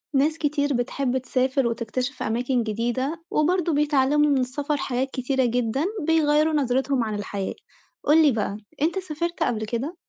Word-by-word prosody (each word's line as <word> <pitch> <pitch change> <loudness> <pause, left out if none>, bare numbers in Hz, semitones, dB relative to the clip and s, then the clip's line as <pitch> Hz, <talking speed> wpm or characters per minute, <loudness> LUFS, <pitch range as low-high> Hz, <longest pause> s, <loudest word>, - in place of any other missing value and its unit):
ناس 300 +4 +2
كتير 290 -2 0
بتحب 255 +1 -1
تسافر 260 0 0
وتكتشف 245 +3 -3
أماكن 245 +2 0
جديدة، 240 +8 -2
وبرضو 345 -1 +2
بيتعلموا 295 0 +3
من 280 - +3
السفر 285 +4 -2
حاجات 265 0 -2
كتيرة 260 0 0
جدًا، 245 +4 0 0.2
بيغيَّروا 310 -1 +3
نظرتهم 265 -2 +1
عن 215 -2 -3
الحياة، 200 -1 -4 0.5
قُل 315 +2 +5
لي 290 - +5
بقى 210 -3 -2 0.2
أنت 335 +5 +1
سافرت 340 -1 -3
قبل 220 -2 -1
كده؟ 245 - -3
270 Hz, 150 wpm, -24 LUFS, 245-300 Hz, 0.5 s, قُل